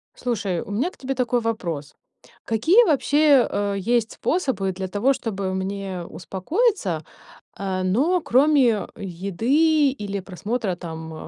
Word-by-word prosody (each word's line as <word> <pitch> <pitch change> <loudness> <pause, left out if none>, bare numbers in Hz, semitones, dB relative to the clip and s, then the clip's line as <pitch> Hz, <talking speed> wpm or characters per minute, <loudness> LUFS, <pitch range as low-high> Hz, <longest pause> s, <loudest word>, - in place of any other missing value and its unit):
Слушай, 205 -8 -2
у - - -8
меня 245 - 0
к - - -21
тебе 270 0 -3
такой 245 -1 0
вопрос. 170 -11 -3 0.5
Какие 320 - +4
вообще, 290 - +4
э, 205 0 -1
есть 230 +3 0
способы 260 - -1
для 190 +1 -5
того, 210 +8 +2
чтобы 195 -7 -3
мне 190 -1 -4
успокоиться, 195 - -1 0.6
э, 190 -1 -2
ну, 280 - +2
кроме 260 -5 +3
еды 245 - +1
или 205 -6 -4
просмотра 200 +2 -3
там, 160 -2 -7
215 Hz, 130 wpm, -23 LUFS, 190-270 Hz, 0.6 s, Какие